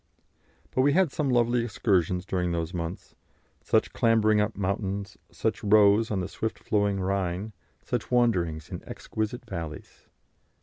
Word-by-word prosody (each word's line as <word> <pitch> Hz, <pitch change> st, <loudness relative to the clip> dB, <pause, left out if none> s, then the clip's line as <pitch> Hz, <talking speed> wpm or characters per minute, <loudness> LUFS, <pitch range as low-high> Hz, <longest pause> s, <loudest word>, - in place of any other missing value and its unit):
But 130 Hz, -, +1 dB
we 140 Hz, +2 st, +4 dB
had 180 Hz, -3 st, +3 dB
some 145 Hz, -1 st, -1 dB
lovely 120 Hz, -1 st, +2 dB
excursions 95 Hz, -6 st, 0 dB
during 90 Hz, -3 st, -1 dB
those 85 Hz, +1 st, -2 dB
months; 85 Hz, +1 st, -5 dB, 0.5 s
such -, -, +1 dB
clambering 110 Hz, -2 st, +3 dB
up 105 Hz, +1 st, -2 dB
mountains, 100 Hz, 0 st, -2 dB
such -, -, -2 dB
rows 105 Hz, +1 st, +5 dB
on 100 Hz, -3 st, -1 dB
the 90 Hz, -, -3 dB
swift 110 Hz, 0 st, -4 dB
flowing 100 Hz, -2 st, 0 dB
Rhine, 95 Hz, +2 st, -2 dB, 0.3 s
such -, -, -2 dB
wanderings 90 Hz, -11 st, +1 dB
in -, -, -6 dB
exquisite 110 Hz, +3 st, -4 dB
valleys. 85 Hz, -6 st, -7 dB
100 Hz, 140 wpm, -27 LUFS, 90-115 Hz, 0.5 s, rows